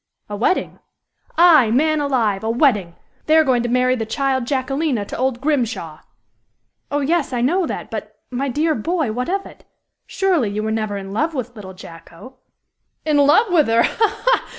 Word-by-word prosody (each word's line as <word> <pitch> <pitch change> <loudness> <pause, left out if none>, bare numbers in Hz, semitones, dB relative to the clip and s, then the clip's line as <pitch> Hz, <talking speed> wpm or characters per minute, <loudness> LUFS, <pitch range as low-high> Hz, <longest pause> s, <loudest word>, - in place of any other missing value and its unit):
"A - - -3
wedding!" 240 - -1 0.6
"Aye, 320 -9 +6
man 305 +6 +2
alive! 230 -8 0
A 220 - -1
wedding! 220 - +1 0.3
They 310 +1 +5
are 320 - +6
going 255 -4 +2
to 240 - -2
marry 250 +1 +2
the 230 - -3
child 260 +2 -1
Jacquelina 270 -3 -1
to - - -7
old 255 -1 -1
Grimshaw." 235 - -2 0.9
"Oh, 290 0 -1
yes, 310 +1 0
I 245 -2 -1
know 340 +8 +1
that; - - -6
but, - - -7
my 270 +3 -2
dear 310 +5 +1
boy, 310 +1 -1
what 250 +5 -3
of 390 +1 -1
it? - - -14 0.4
Surely 360 - +1
you 210 +1 -3
were 220 - -2
never 215 -2 -2
in 195 0 -7
love 310 +8 -1
with 245 -2 -5
little 190 -3 -10
Jacko?" 170 +8 -13 0.7
"In 305 -2 +2
love 335 +9 +4
with 310 -4 +4
her! 230 +1 +3
ha! 440 -2 0
ha! - - +2
260 Hz, 185 wpm, -20 LUFS, 225-310 Hz, 0.9 s, Aye